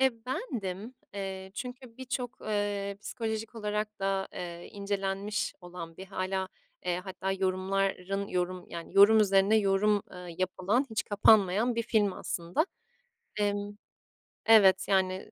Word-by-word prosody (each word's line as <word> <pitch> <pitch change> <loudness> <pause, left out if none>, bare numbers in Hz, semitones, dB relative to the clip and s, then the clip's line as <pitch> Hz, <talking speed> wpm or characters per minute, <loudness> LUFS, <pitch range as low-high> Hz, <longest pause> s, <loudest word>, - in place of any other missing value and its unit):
E, 265 -1 +5
bendim, 230 - -4 0.2
eee, 190 -1 -5
çünkü 250 0 -7
birçok, 250 -1 -4
eee, 205 -1 -1
psikolojik 220 -1 -4
olarak 210 -1 -3
da, 195 0 0
eee, 175 -1 -7
incelenmiş 200 0 -2
olan 175 -2 -9
ve 190 - -6
hâlâ, 190 0 -2 0.4
eee, 180 0 0
hatta 190 0 -3
yorumların 195 +1 0
yorum 180 0 -2
yani, 170 0 -8
yorum 210 +2 +8
üzerine 195 +1 +4
yorum, 205 0 +3
ııı, 180 -1 -9
yapılan, 185 +7 +1
hiç 220 - -1
kapanmayan 205 +2 +4
bir 230 - 0
film 215 -4 +2
aslında. 175 - -1 0.7
Emm 205 0 -1 0.7
Evet, 195 -4 +7
yani 190 -1 +1
200 Hz, 125 wpm, -30 LUFS, 190-215 Hz, 0.7 s, yorum